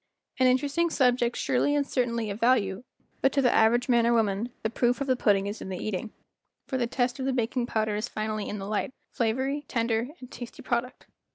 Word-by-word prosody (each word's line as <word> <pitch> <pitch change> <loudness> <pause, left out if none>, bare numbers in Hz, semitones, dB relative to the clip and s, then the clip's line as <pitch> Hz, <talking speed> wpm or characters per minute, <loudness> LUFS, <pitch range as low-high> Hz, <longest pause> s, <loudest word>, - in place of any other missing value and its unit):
An 255 - +5
interesting 285 +6 +2
subject 245 -5 +2
surely 290 +3 +1
and 285 -1 +1
certainly 235 -5 -1
of 200 - -6
value, 225 -4 +2 0.4
but 270 - +4
to 280 - +2
the 245 - +4
average 235 +2 +4
man 235 -2 +4
or 235 - +4
woman 220 0 +1
"the 220 - -1
proof 240 +1 +1
of 275 - -1
the 260 -1 +2
pudding 200 -5 +2
is 205 +2 -5
in - - -6
the 185 - -4
eating, 215 +3 -4 0.5
for 260 - -2
the 240 - +1
test 245 +2 -1
of 260 - -2
the 270 - +1
baking 240 0 -1
powder 215 -2 0
is 215 +3 -2
finally 215 -1 -3
in 210 - -4
the 195 - -6
light, 215 +5 -2 0.2
flavory, 260 +5 0
tender, 230 0 0
and 255 -1 -11
tasty 240 -1 -9
product. 240 +1 -2
240 Hz, 215 wpm, -27 LUFS, 220-255 Hz, 0.5 s, An